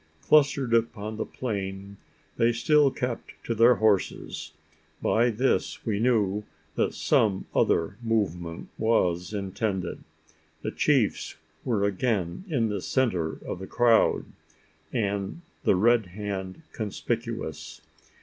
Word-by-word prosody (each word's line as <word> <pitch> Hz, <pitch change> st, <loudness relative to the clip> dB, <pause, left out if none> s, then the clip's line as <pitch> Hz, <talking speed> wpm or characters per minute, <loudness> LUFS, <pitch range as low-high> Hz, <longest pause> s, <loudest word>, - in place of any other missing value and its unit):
Clustered 140 Hz, -5 st, +3 dB
upon 110 Hz, -2 st, 0 dB
the -, -, -3 dB
plain, 100 Hz, -4 st, -5 dB, 0.4 s
they 115 Hz, +1 st, +4 dB
still 145 Hz, +4 st, +4 dB
kept 125 Hz, -2 st, -4 dB
to 115 Hz, -, -1 dB
their 115 Hz, +2 st, +6 dB
horses. 110 Hz, -3 st, 0 dB, 0.5 s
By 120 Hz, +2 st, +3 dB
this, 120 Hz, +4 st, 0 dB
we 105 Hz, -3 st, 0 dB
knew 105 Hz, -4 st, +2 dB, 0.3 s
that -, -, 0 dB
some 95 Hz, -3 st, +2 dB
other 85 Hz, +5 st, +2 dB
movement 90 Hz, -8 st, -2 dB
was 90 Hz, -6 st, +1 dB
intended. 100 Hz, -1 st, -3 dB, 0.6 s
The -, -, -2 dB
chiefs -, -, +1 dB, 0.3 s
were 110 Hz, -5 st, 0 dB
again 100 Hz, -, -1 dB
in 120 Hz, -8 st, +1 dB
the 100 Hz, -2 st, -2 dB
centre 90 Hz, -13 st, 0 dB
of -, -, -4 dB
the 95 Hz, -, -7 dB
crowd, 120 Hz, -2 st, +3 dB, 0.7 s
the 100 Hz, -, -1 dB
Red 115 Hz, +2 st, +3 dB
Hand 95 Hz, -, -5 dB
conspicuous. 105 Hz, -8 st, -4 dB
105 Hz, 110 wpm, -27 LUFS, 95-120 Hz, 0.7 s, their